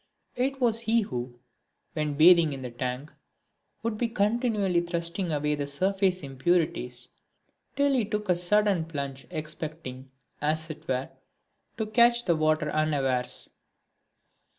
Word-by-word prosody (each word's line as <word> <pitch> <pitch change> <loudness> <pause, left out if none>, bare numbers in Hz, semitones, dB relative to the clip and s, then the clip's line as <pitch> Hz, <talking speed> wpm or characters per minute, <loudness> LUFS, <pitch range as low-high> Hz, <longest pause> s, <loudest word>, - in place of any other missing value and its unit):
It 270 +2 -1
was 230 -3 +2
he 230 0 +2
who, 125 - -5 0.6
when 150 -2 -2
bathing 165 0 +6
in 135 -1 -7
the 125 - -5
tank, 125 +4 -4 0.7
would 225 -2 -2
be 240 - +1
continually 210 -4 +1
thrusting 170 +1 -2
away 150 0 0
the 145 -1 -2
surface 185 +4 0
impurities 135 -3 -1 0.7
till 280 0 +3
he 255 -4 +2
took 210 0 -3
a 180 - +3
sudden 190 0 +2
plunge 140 -5 -5
expecting, 155 -4 -6 0.3
as 155 +2 0
it 155 - -11
were, 130 0 -2 0.7
to 220 - -1
catch 235 +2 +4
the 170 - +3
water 155 -1 +1
unawares. 135 -5 0
165 Hz, 130 wpm, -27 LUFS, 140-210 Hz, 0.7 s, bathing